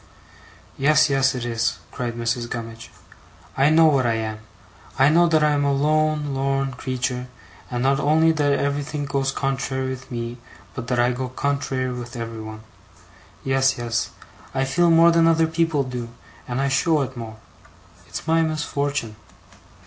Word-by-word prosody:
'Yes, 150 Hz, +2 st, +4 dB
yes, 135 Hz, -1 st, +2 dB
it 125 Hz, -1 st, -4 dB
is,' 115 Hz, -4 st, -1 dB
cried 120 Hz, -2 st, -4 dB
Mrs. 120 Hz, 0 st, -2 dB
Gummidge. 115 Hz, -1 st, -7 dB, 0.7 s
'I 135 Hz, +2 st, +4 dB
know 160 Hz, +1 st, +6 dB
what 140 Hz, -5 st, +3 dB
I 115 Hz, -, +1 dB
am. 110 Hz, -1 st, -3 dB, 0.6 s
I 135 Hz, +1 st, +5 dB
know 170 Hz, +3 st, +5 dB
that 160 Hz, -2 st, +3 dB
I 150 Hz, -, +4 dB
am 145 Hz, -1 st, +1 dB
a 140 Hz, -, +2 dB
lone 150 Hz, +1 st, +1 dB
lorn 135 Hz, 0 st, -1 dB
creetur', 125 Hz, 0 st, -3 dB, 0.4 s
and 120 Hz, 0 st, -2 dB
not 135 Hz, +1 st, +2 dB
only 155 Hz, +2 st, +4 dB
that 145 Hz, -3 st, +1 dB
everythink 145 Hz, +1 st, -2 dB
goes 135 Hz, -1 st, 0 dB
contrary 135 Hz, -1 st, -2 dB
with 130 Hz, 0 st, -8 dB
me, 120 Hz, 0 st, -5 dB, 0.3 s
but 125 Hz, -3 st, -6 dB
that 125 Hz, -1 st, 0 dB
I 120 Hz, +1 st, +3 dB
go 125 Hz, +1 st, -4 dB
contrary 130 Hz, -1 st, -2 dB
with 120 Hz, 0 st, -7 dB
everybody. 110 Hz, -2 st, -6 dB, 0.8 s
Yes, 135 Hz, 0 st, +2 dB
yes. 115 Hz, -2 st, -2 dB, 0.5 s
I 135 Hz, 0 st, +1 dB
feel 170 Hz, +6 st, +2 dB
more 165 Hz, +1 st, +6 dB
than 165 Hz, 0 st, +4 dB
other 165 Hz, 0 st, +4 dB
people 160 Hz, -2 st, +1 dB
do, 125 Hz, -2 st, -5 dB, 0.4 s
and 125 Hz, +1 st, -2 dB
I 135 Hz, -, +1 dB
show 150 Hz, +3 st, +2 dB
it 130 Hz, 0 st, -7 dB
more. 115 Hz, -2 st, -7 dB, 0.7 s
It's -, -, -6 dB
my 165 Hz, 0 st, +3 dB
misfortun'. 145 Hz, -6 st, -2 dB
135 Hz, 165 wpm, -23 LUFS, 120-150 Hz, 0.8 s, know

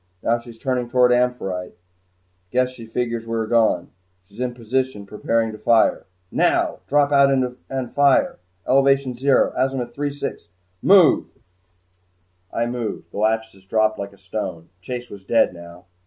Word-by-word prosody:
Now 120 Hz, +1 st, +2 dB
she's 120 Hz, -1 st, -13 dB
turning 125 Hz, 0 st, -2 dB
toward 125 Hz, 0 st, +4 dB
'Amphitrite.' 120 Hz, -7 st, -1 dB, 0.7 s
Guess 125 Hz, +3 st, +1 dB
she 115 Hz, -3 st, -11 dB
figures 115 Hz, 0 st, -3 dB
we 115 Hz, -, -2 dB
are 110 Hz, -, 0 dB
gone. 110 Hz, -6 st, +2 dB, 0.3 s
She's 100 Hz, +4 st, -17 dB
in 125 Hz, -1 st, -2 dB
position 125 Hz, -2 st, -2 dB
preparing 115 Hz, +2 st, -1 dB
to 110 Hz, -, -10 dB
fire. 115 Hz, -2 st, +3 dB, 0.2 s
Now! -, -, +1 dB
Drop 145 Hz, 0 st, +3 dB
out 140 Hz, -1 st, +5 dB
and 130 Hz, -1 st, -2 dB
fire 140 Hz, -1 st, +3 dB, 0.3 s
elevation 135 Hz, -1 st, +3 dB
zero, 135 Hz, +3 st, +2 dB
azimuth 130 Hz, -2 st, -1 dB
three 145 Hz, +2 st, -2 dB
sixty 140 Hz, 0 st, -6 dB, 0.3 s
Move!" 190 Hz, -4 st, +5 dB, 1.2 s
I 115 Hz, -, -1 dB
moved. 120 Hz, -2 st, -5 dB
The -, -, -6 dB
"Lachesis" 110 Hz, -3 st, -1 dB
dropped 110 Hz, +1 st, +1 dB
like 100 Hz, 0 st, -5 dB
a -, -, -19 dB
stone. 95 Hz, -4 st, -6 dB
Chase 125 Hz, +4 st, -6 dB
was 100 Hz, -2 st, -10 dB
dead 115 Hz, -1 st, +2 dB
now. 85 Hz, 0 st, -12 dB
120 Hz, 150 wpm, -22 LUFS, 110-130 Hz, 1.2 s, out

